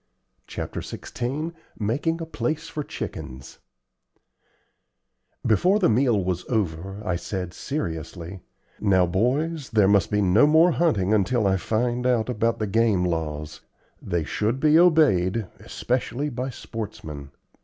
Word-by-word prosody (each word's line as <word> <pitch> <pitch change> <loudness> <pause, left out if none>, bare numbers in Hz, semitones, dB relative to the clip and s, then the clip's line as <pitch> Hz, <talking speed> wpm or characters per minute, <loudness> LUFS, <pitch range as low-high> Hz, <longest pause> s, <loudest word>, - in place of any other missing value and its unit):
CHAPTER - - -5
XVI 145 +7 -4 0.2
MAKING 140 +10 -1
A - - -3
PLACE 160 0 -3
FOR 150 - -4
CHICKENS 65 - -7 1.9
Before 180 - +3
the 205 - +3
meal 115 -4 +2
was 90 -1 -2
over, 95 -2 -2
I 90 - 0
said, 90 0 -4
seriously, 85 - -5 0.4
"Now, 95 -3 +3
boys, 135 - 0
there 105 -3 +4
must 100 -4 +3
be 105 0 +1
no 100 +10 +5
more 160 +3 +5
hunting 110 - +1
until 110 +2 +2
I 95 -1 +3
find 120 +5 -1
out 120 -2 +1
about 115 -1 0
the 110 - -1
game 105 -3 +2
laws. 75 -3 -3 0.4
They 85 -4 -1
should 110 - -1
be 155 +2 +5
obeyed, 115 - +4
especially 130 +3 -2
by 125 +2 -3
sportsmen. 100 - -7
110 Hz, 130 wpm, -24 LUFS, 95-135 Hz, 1.9 s, no